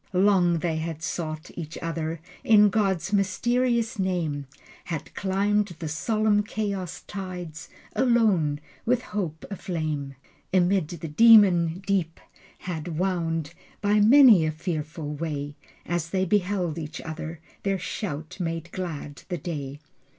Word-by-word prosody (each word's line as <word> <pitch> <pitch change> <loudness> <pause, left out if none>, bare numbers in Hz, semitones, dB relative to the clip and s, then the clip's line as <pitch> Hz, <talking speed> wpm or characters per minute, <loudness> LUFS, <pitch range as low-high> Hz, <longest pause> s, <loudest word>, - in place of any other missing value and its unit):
Long 180 -2 +4
they 165 -1 -1
had 160 0 -4
sought 155 -3 -4
each 165 -2 -6
other 165 -1 -3 0.2
In 210 -2 +6
God's 195 -3 0
mysterious 235 +3 +1
name, 165 -7 -1 0.4
Had 165 -4 -5
climbed 200 0 0
the 160 -1 -5
solemn 210 +6 +1
chaos 200 -4 -3
tides 180 -5 -7 0.3
Alone, 210 - +3 0.2
with 250 +1 +1
hope 175 -7 -4
aflame: 155 -7 -3 0.4
Amid 185 -2 +3
the 165 0 -6
demon 185 -2 +6
deeps 180 -4 0 0.4
had 165 -2 -5
wound 165 -4 -1 0.3
By 210 0 +3
many 225 - +8
a 155 - +1
fearful 155 -2 -4
way. 145 -2 -4 0.3
As 170 0 -2
they 185 +1 +1
beheld 185 -4 0
each 155 -1 -6
other 160 0 -6 0.2
Their 195 -1 0
shout 160 -3 -5
made 165 -1 -3
glad 155 -6 -5
the 175 - -2
day. 145 -4 -5
175 Hz, 125 wpm, -26 LUFS, 160-200 Hz, 0.4 s, many